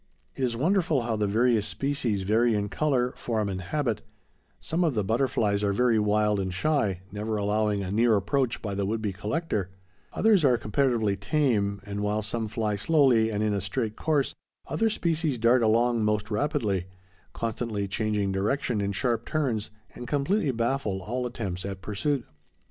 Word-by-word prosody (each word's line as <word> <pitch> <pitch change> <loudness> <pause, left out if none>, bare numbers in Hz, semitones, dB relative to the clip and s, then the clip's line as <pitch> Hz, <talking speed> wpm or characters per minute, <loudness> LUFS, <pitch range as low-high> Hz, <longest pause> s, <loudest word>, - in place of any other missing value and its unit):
It 135 - -3
is 120 -2 0
wonderful 165 - +2
how 115 -1 -1
the 105 -1 0
various 115 +1 +2
species 135 -8 -1
vary 110 +3 +3
in 100 0 -1
color, 130 -3 +1
form, 110 -3 -1
and 95 -1 -3
habit; 120 - -1 0.6
some 170 +3 -1
of 155 -7 +1
the 105 - +1
butterflies 110 -2 +1
are 100 -1 +2
very 120 +1 +3
wild 105 0 +2
and 95 -1 -2
shy, 100 - 0
never 105 +1 -3
allowing 105 0 0
a 95 - -4
near 115 +2 +4
approach 115 +5 0
by 105 -2 -3
the 100 0 -1
would 110 +2 -1
be 105 -3 -2
collector; 105 - -2 0.4
others 215 -6 +3
are 125 -4 +4
comparatively 110 -2 +1
tame; 100 -3 0
and 100 0 -5
while 105 +1 0
some 115 +1 -2
fly 105 -1 -1
slowly 125 -3 +3
and 105 0 -1
in 105 -1 +1
a 100 - -1
straight 105 +3 -2
course, 150 -4 0 0.3
other 225 0 +1
species 165 - 0
dart 120 +2 +4
along 115 +1 +3
most 105 0 0
rapidly, 105 - 0 0.5
constantly 110 -3 -3
changing 105 -1 -1
direction 105 +3 0
in 100 0 -1
sharp 120 +2 0
turns, 130 -9 -1 0.2
and 125 - -8
completely 150 - +1
baffle 115 -5 -1
all 125 +5 -2
attempts 100 -7 -4
at 95 -1 -5
pursuit. 115 +6 -1
110 Hz, 170 wpm, -27 LUFS, 105-130 Hz, 0.6 s, near